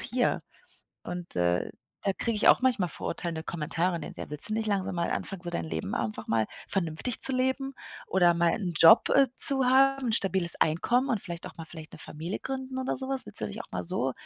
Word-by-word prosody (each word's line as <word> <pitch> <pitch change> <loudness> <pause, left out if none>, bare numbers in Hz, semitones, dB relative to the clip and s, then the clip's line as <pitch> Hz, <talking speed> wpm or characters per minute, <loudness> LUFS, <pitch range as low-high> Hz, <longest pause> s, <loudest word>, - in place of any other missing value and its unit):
hier 245 0 0 0.6
und, 175 - -7
äh, 85 0 +1 0.4
da 195 - +3
kriege 230 +3 -1
ich 210 - +4
auch - - +6
manchmal 235 -10 +1
verurteilende 165 -2 -4
Kommentare, 170 +2 -2
ne 150 - -7
so: - - -10
„Ja, - - -6
willst 150 +7 +2
du - - -1
nicht 220 0 -1
langsam 195 -3 -1
mal 170 -1 -1
anfangen, 195 -3 -4
so 175 - -6
dein 85 - -3
Leben 80 +4 -4
einfach 110 -1 -3
mal 115 -1 +2 0.2
vernünftig 185 +5 -1
zu 265 - +6
leben 260 +1 0 0.3
oder 175 -2 +4
mal 170 0 +2
'n 185 -5 -2
Job, 220 +8 +8
äh, 275 -2 +5
zu 270 -1 +4
haben, 270 0 +4
'n 225 - 0
stabiles 190 -4 +1
Einkommen 240 - +2
und 225 -7 -1
vielleicht 170 0 -7
auch - - -10
mal 165 - -7
vielleicht 160 -1 -11
'ne - - -12
Familie 160 +6 -6
gründen 265 0 -5
oder 260 0 -1
so 265 - -5
was? 270 -1 -2
Willst - - -3
du - - -1
denn - - -7
nicht - - -5
auch - - -23
mal - - -2
so“ 150 -7 0
185 Hz, 230 wpm, -28 LUFS, 165-255 Hz, 0.6 s, Job